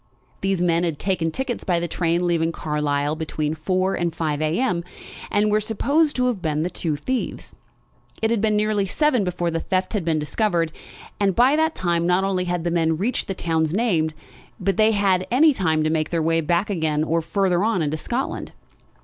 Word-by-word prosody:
These 195 -2 0
men 170 -1 +2
had 165 -4 -1
taken 180 -3 -1
tickets 255 +7 -3
by 175 -2 +1
the 170 - -2
train 170 +1 0
leaving 165 -1 +1
Carlisle 150 -2 -1
between 155 -1 -2
four 185 +4 0
and 170 -1 -2
five 155 -2 -1
a.m., 170 +3 0 0.5
and 210 +1 +2
were 215 +1 +3
supposed 285 +9 +1
to 250 - +1
have 240 -7 -1
been 155 -2 -1
the 180 - -2
two 160 -3 -2
thieves. 250 - -4 0.7
It 220 0 +1
had 230 -3 +1
been 215 -1 +2
nearly 210 -1 +1
seven 280 0 +2
before 175 -2 -1
the 165 - -1
theft 185 +2 -1
had 205 -5 -1
been 160 -1 +1
discovered, 165 +2 0 0.5
and 195 -3 +2
by 255 +4 +5
that 320 +1 +1
time 170 -1 0
not 180 +2 +3
only 190 -2 0
had 175 -1 -2
the 170 - -1
men 165 -2 +1
reached 220 +9 -1
the 195 - -3
towns 160 -1 0
named, 170 -9 +1 0.4
but 195 0 -1
had 200 -4 +3
had 295 +5 +5
time 160 -6 +1
to 155 - +1
make 155 -1 0
their 165 -2 0
way 165 +1 +2
back 170 +6 0
again 155 -4 0
or 165 +1 0
farther 185 +1 +1
on 215 -6 +1
into 150 +1 -1
Scotland. 240 - -3
175 Hz, 200 wpm, -22 LUFS, 160-210 Hz, 0.7 s, by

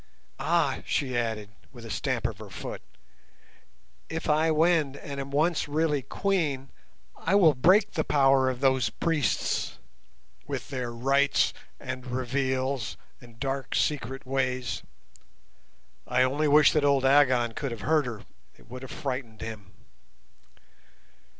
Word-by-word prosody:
"Ah!" - - +1
she 130 -3 -1
added, 110 -3 -2 0.2
with 120 -3 -11
a 115 - -7
stamp 95 - -2
of - - -2
her - - -9
foot, - - -7 1.3
"if 160 0 -4
I 155 +2 +3
win 160 -3 +2
and 140 -1 -7
am 135 0 -5
once 155 +5 +1
really 150 -1 +1
Queen, 145 - -1 0.4
I 185 - 0
will 170 -7 +6
break 185 - +4
the 155 - -1
power 135 -3 +4
of 130 0 -4
those 130 -2 +3
priests, 160 -6 -1 0.7
with - - -5
their 125 -3 -3
rites 135 +4 +2 0.3
and 130 0 -6
revels 130 0 -1 0.2
and 120 -2 -16
dark 135 -1 -3
secret 135 -3 -1
ways." 130 -1 -1 1.3
I 125 +1 +3
only 145 +4 +1
wished 150 0 +6
that 150 - +2
old 140 -2 +3
Agon 130 -4 +4
could 135 +5 -4
have 115 -3 -7
heard 155 +1 +2
her, 115 -4 -6 0.3
it - - -20
would 125 +1 -8
have 130 - -8
frightened 125 -5 -5
him. 110 -4 -7
135 Hz, 135 wpm, -27 LUFS, 125-150 Hz, 1.3 s, will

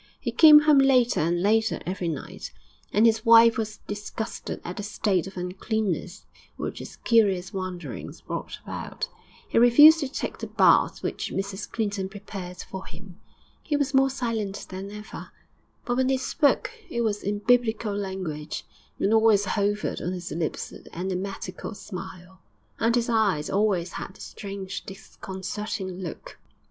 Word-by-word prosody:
He - - -3
came 305 -2 +9
home 300 -2 +5
later 255 -3 +4
and 175 +3 +1
later 220 +2 +2
every 185 -1 -3
night, 155 -5 -5 0.4
and 215 +2 +4
his 225 -1 +3
wife 230 -1 +7
was 215 -1 -3
disgusted 210 +2 -5
at 175 - -6
the - - -3
state 200 -3 0
of 195 - -10
uncleanness 185 0 -3 0.3
which - - -4
his - - -9
curious 195 -6 +2
wanderings 185 -2 -6
brought - - -5
about. - - -5 0.4
He - - +2
refused 295 +7 +8
to 285 - -1
take 265 - -5
the - - -5
baths - - +3
which - - -3
Mrs 195 +1 -4
Clinton 205 -4 -2
prepared 195 -3 -8
for 190 0 -7
him. 180 +2 -13 0.4
He 295 - -1
was 285 0 -1
more 270 0 +5
silent 230 -6 -3
than 190 +1 -6
ever, 210 +1 -9 0.6
but 245 0 -1
when 260 0 +2
he 265 - +3
spoke 280 +2 +1 0.2
it 235 -6 -2
was 210 -3 0
in 205 +1 -1
biblical 225 -1 +2
language; 185 -7 -4 0.3
and 205 - +1
always 220 -2 +5
hovered 205 +1 -1
on 180 - -2
his 180 -1 -6
lips 160 -2 -3
the - - -12
enigmatical 190 +1 -4
smile, 185 -1 -9 0.4
and 230 +1 +2
his 235 -1 +1
eyes 210 -10 +1
always 195 -4 +1
had - - -7
the - - -14
strange, 195 -2 -6
disconcerting 190 0 -6
look. 175 -4 -8
205 Hz, 155 wpm, -26 LUFS, 185-230 Hz, 0.6 s, came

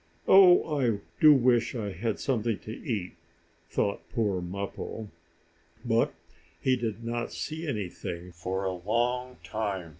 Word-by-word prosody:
"Oh, 180 -6 +7
I 115 -5 +2 0.2
do 155 -2 +9
wish 120 -3 +3
I 105 -4 -3
had 105 +4 -2
something 115 -5 0
to 110 - -8
eat!" 105 -6 -4 0.5
thought 100 - 0
poor 105 -6 0
Mappo. 100 +4 -5 0.8
But 115 -1 +2 0.5
he 130 -1 +2
did 115 -2 -3
not 120 +1 -3
see 160 +1 -5
anything 90 - -4
for 90 +3 -3
a 95 -1 -1
long 120 +7 -1
time. 100 -6 -3
115 Hz, 130 wpm, -28 LUFS, 100-125 Hz, 0.8 s, do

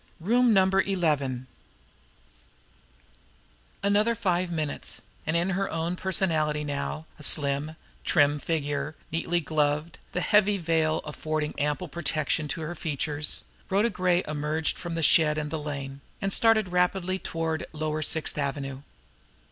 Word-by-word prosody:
IX. 170 +5 -7
ROOM 245 0 +5
NUMBER 190 0 +4
ELEVEN 150 -10 0 2.4
Another 210 +3 +3
five 185 -5 0
minutes, 155 -3 -3 0.2
and 160 +2 +2
in 175 +3 +1
her 195 +1 0
own 165 +2 -1
personality 160 -6 +1
now, 145 +2 -3
a - - -10
slim, 145 +2 +2 0.3
trim 145 -2 +3
figure, 145 -1 -2 0.2
neatly 170 +2 0
gloved, 150 +1 0
the 180 - 0
heavy 205 +1 +4
veil 160 -2 +1
affording 155 0 -2
ample 150 +5 -1
protection 155 -1 -1
to 145 +3 -4
her 160 +2 -4
features, 150 -2 -1 0.3
Rhoda 205 +5 +3
Gray 180 -1 +2
emerged 150 +1 0
from 170 -1 -5
the 165 - -1
shed 150 +1 +5
and 150 -1 -3
the 160 - -2
lane, 140 -2 -5 0.2
and 195 0 -1
started 220 -4 +4
rapidly 180 +1 +1
toward 160 -2 -2
lower 155 0 -2
Sixth 155 0 0
Avenue. 135 -1 -3
160 Hz, 135 wpm, -27 LUFS, 150-180 Hz, 2.4 s, ROOM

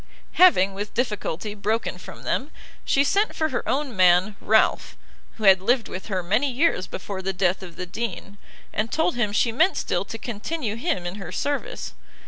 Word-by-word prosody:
Having, 200 - +5
with 205 +2 -6
difficulty, 210 -4 -2
broken 215 +2 -2
from - - -11
them, 275 - -1 0.3
she 275 - +3
sent 405 +9 +1
for 315 0 0
her 250 - -3
own 275 -3 -1
man, 185 +2 +4
Ralph, 220 +1 +2 0.4
who 220 - -9
had 190 -2 +7
lived 235 +3 +2
with 185 - -7
her 190 -4 -2
many 220 +11 +1
years 250 - +1
before 190 0 -6
the 190 +1 -2
death 185 0 +1
of 180 -3 -10
the 180 - -5
Dean, 200 0 -5 0.3
and 220 +2 -1
told 320 +2 +1
him 225 -4 0
she 230 +3 +2
meant 315 +12 +2
still - - -1
to - - -6
continue 235 +1 -4
him 240 - -2
in 175 +3 -4
her 175 - -7
service. 290 - -3
215 Hz, 185 wpm, -24 LUFS, 190-265 Hz, 0.4 s, had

